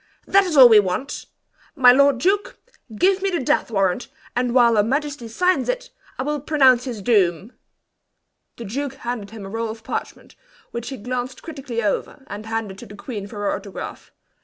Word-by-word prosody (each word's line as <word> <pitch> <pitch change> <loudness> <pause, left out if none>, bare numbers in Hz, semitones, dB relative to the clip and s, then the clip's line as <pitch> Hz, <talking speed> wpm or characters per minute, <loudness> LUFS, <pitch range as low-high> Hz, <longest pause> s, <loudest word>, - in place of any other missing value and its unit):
"That 395 0 +4
is 335 -5 -1
all 260 -2 +11
we 220 -3 +7
want! 200 +8 -3 0.5
My 255 -4 +7
lord 280 +1 +4
duke, 405 - 0 0.4
give 380 - +3
me 390 - +1
the 355 - -1
death 255 - +1
warrant, 195 +1 0 0.3
and 245 0 0
while 235 -2 +5
her 210 - +5
majesty 275 +2 -2
signs 360 - +1
it, - - -3 0.3
I - - -2
will 295 +1 -2
pronounce 265 -4 +4
his 235 -6 -6
doom!" 195 -1 +1 1.0
The 235 - -7
duke 270 +6 -4
handed 240 -6 -5
him 215 -2 -9
a - - -8
roll 225 +2 -3
of 220 0 -8
parchment, - - -6 0.4
which 235 0 -5
he 265 - -6
glanced 250 +3 -5
critically 270 -7 -5
over, 210 +6 -2
and 210 -1 -8
handed 220 -4 -4
to - - -10
the 205 - -11
queen 205 -2 -7
for 210 - -12
her 205 - 0
autograph. 200 0 -7
245 Hz, 185 wpm, -22 LUFS, 215-280 Hz, 1.0 s, all